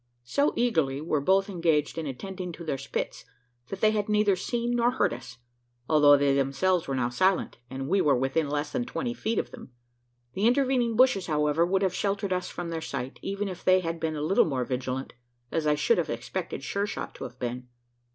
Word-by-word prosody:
So 280 - +1
eagerly 160 - +1
were 155 -1 -1
both 195 +5 +3
engaged 165 -6 +1
in 160 -2 -3
attending 180 +7 -5
to 170 - -9
their 140 -4 -2
spits, 135 - -4 0.4
that 195 - -7
they 215 - +5
had 210 -1 -1
neither 210 -2 +3
seen 235 +5 -2
nor 240 0 +3
heard 250 - +1
us 120 -1 -9 0.5
although 145 -2 +6
they 140 -1 +3
themselves 140 +7 +1
were 135 - -1
now 120 -2 0
silent, 185 +10 +1
and 135 +1 -5
we 190 +5 +3
were 145 -2 +4
within 135 +4 0
less 145 0 -2
than 245 - -1
twenty 245 -1 -3
feet 225 -2 -2
of - - -1
them. 125 - -11 0.6
The 200 +4 +2
intervening 250 -2 +2
bushes, 235 -6 +4
however 150 +1 +2
would 190 +2 +1
have 190 -2 +1
sheltered 200 0 -1
us 180 0 -2
from 175 -1 -5
their 165 -1 -3
sight, 130 -3 -5
even 200 +1 -3
if 185 -2 -7
they 185 0 +5
had 165 -1 -3
been 160 -1 -2
a 150 - -3
little 190 +6 +4
more 130 -5 -1
vigilant 130 +1 -3 0.4
as 160 -2 0
I 150 - +4
should 465 - +2
have - - -1
expected - - -4
Sure 200 +1 -1
shot - - -5
to - - -8
have 125 +1 -10
been. 125 0 -4
165 Hz, 210 wpm, -27 LUFS, 140-200 Hz, 0.6 s, although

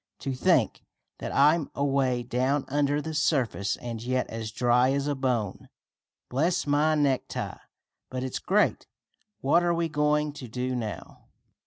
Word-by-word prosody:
"To 135 - -2
think 125 - +2 0.4
that - - -4
I'm 150 +2 +4
away 135 -3 +1
down 130 +3 0
under 145 +1 +1
the 160 - -4
surface, 135 -9 +1
and 115 -2 -6
yet 130 +2 0
as 110 -1 -4
dry 125 +3 +3
as 140 0 0
a 145 - 0
bone. 125 -7 -2 0.6
Bless 165 +8 0
my 150 +2 +3
necktie, 140 -3 -1 0.5
but 130 0 -4
it's 130 - -3
great! 210 +2 +1 0.5
What 145 +6 +4
are 175 -1 +1
we 165 -1 0
going 150 0 +1
to 135 -3 -8
do 125 +2 -3
now?" 110 -4 -6
135 Hz, 150 wpm, -27 LUFS, 125-150 Hz, 0.6 s, I'm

